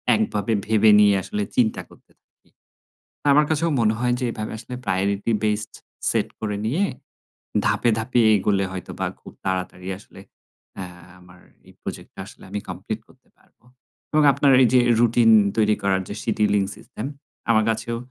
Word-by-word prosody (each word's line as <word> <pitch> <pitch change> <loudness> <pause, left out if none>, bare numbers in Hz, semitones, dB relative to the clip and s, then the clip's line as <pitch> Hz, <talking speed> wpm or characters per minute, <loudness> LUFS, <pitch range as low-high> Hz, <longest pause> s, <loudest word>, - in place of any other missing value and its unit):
একভাবে 110 0 -1
ভেবে 110 0 +4
নিয়ে 105 -1 +6
আসলে 105 - -4
চিন্তা 115 -3 +2
করতে - - -21
থাকি। - - -37 0.8
আমার 150 +2 +5
কাছেও 160 +1 +1
মনে 110 0 +3
হয় 125 0 +1
যে - - -1
এভাবে 110 0 -5
আসলে 125 +2 -8
প্রায়োরিটি 100 +4 0
বেসড 105 0 -1 0.4
সেট - - 0
করে 105 -2 -2
নিয়ে 160 - +1 0.8
ধাপে, 120 - +1
ধাপে 120 +2 +1
এগোলে 100 0 +1
হয়তোবা 95 -2 -5
খুব - - -12
তাড়াতাড়ি 95 -1 -3
আসলে - - -15 1.0
আমার 90 0 -18 0.3
এই - - -15
প্রজেক্টটা - - -8
আসলে - - -15
আমি 105 +1 -3
কমপ্লিট 95 +5 -5
করতে 130 - -25
পারব - - -31 0.6
এবং 155 0 +4
আপনার 140 -1 +3
এই 120 - +5
যে 125 - +7 0.2
রুটিন 120 -1 +4 0.3
তৈরি 105 -1 +3
করার 95 -1 +1
যে - - -5
সিডিউলিং 105 -3 +2
সিস্টেম, 110 +2 -8 0.4
আমার 110 -1 +4
কাছেও 115 +1 -3
110 Hz, 150 wpm, -23 LUFS, 100-120 Hz, 1.0 s, যে